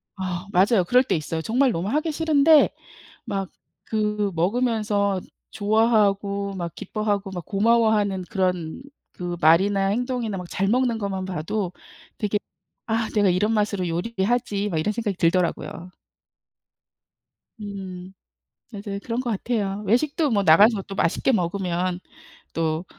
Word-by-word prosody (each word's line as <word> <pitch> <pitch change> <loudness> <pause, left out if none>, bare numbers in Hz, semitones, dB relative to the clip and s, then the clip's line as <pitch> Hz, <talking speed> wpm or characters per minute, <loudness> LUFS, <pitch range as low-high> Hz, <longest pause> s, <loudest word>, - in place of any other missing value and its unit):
아, 185 -2 -4
맞아요. 195 +2 +4
그럴 250 +1 +5
때 - - 0
있어요. 160 +1 -3
정말 250 +8 +2
너무 180 0 -2
하기 305 +6 0
싫은데 310 -1 +5 0.6
막 195 -5 -3 0.4
그 210 -2 0
먹으면서 205 0 +1 0.3
좋아하고 205 -2 +1
막 170 -3 -5
기뻐하고 205 -1 -2
막 175 -4 -6
고마워하는 210 -3 +2
그런 180 -2 -1 0.3
그 175 -1 -5
말이나 195 +5 +4
행동이나 235 -1 -1
막 180 - -6
잘 195 +1 -1
먹는 240 +1 +2
것만 195 -3 -3
봐도 185 +2 -3 0.5
되게 210 -1 0 0.5
'아 225 0 0
내가 205 -2 +4
이런 205 +5 +1
맛으로 205 -4 0
요리를 190 +4 -2
하지.' 210 -3 0
막 175 -6 -2
이런 160 +7 0
생각이 215 -3 -2
들더라고요. 170 0 +1 1.9
음. 190 -2 -7 0.6
맞아요. 200 -2 -6
그런 235 +1 -2
것 250 -2 -3
같아요. 210 -2 -2
외식도 290 - +1
뭐 205 -4 +2
나가서 200 +6 +6
또 195 - -9
맛있게 195 +8 +1
먹으면 180 -2 -1 0.5
또 160 +1 -1
200 Hz, 285 characters per minute, -24 LUFS, 185-225 Hz, 1.9 s, 나가서